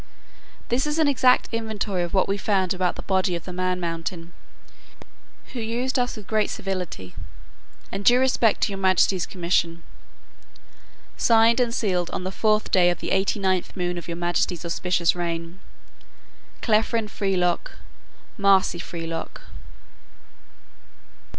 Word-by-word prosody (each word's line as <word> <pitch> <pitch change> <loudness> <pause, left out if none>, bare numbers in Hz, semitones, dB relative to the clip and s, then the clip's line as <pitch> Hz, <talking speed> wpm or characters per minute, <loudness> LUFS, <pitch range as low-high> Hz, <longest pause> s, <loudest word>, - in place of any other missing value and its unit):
"This 255 +5 +1
is 300 +1 -1
an 315 -2 +3
exact 255 -2 +4
inventory 220 -4 -2
of 175 -1 -3
what 190 - +2
we 195 - 0
found 195 -2 +1
about 185 -1 0
the - - -7
body 190 -2 +1
of 170 - -6
the 180 - -7
man 185 0 -1
mountain, 170 0 -4 1.2
who 250 - -4
used 240 +4 -1
us 245 -1 -1
with 210 - -9
great 215 0 +1
civility, 180 - -5 0.8
and 195 +1 -4
due 245 +4 +6
respect 255 -4 +2
to - - +2
your 195 - -5
majesty's 190 -1 +2
commission. 170 -2 -1 1.3
Signed 230 +1 +4
and 245 -2 +2
sealed 185 -7 -1
on - - -4
the 185 - -3
fourth 215 +1 +1
day 180 -2 +5
of 175 - -1
the - - -4
eighty 190 +2 +1
ninth 190 -1 -1
moon 175 -1 -1
of 175 - -7
your 170 -1 -4
majesty's 175 0 -1
auspicious 175 0 +1
reign. 170 0 -4 1.0
Clefrin 220 0 +1
Frelock, 185 -4 -1 0.7
Marsi 195 -3 +3
Frelock." 165 -1 -6
190 Hz, 140 wpm, -24 LUFS, 175-220 Hz, 1.3 s, due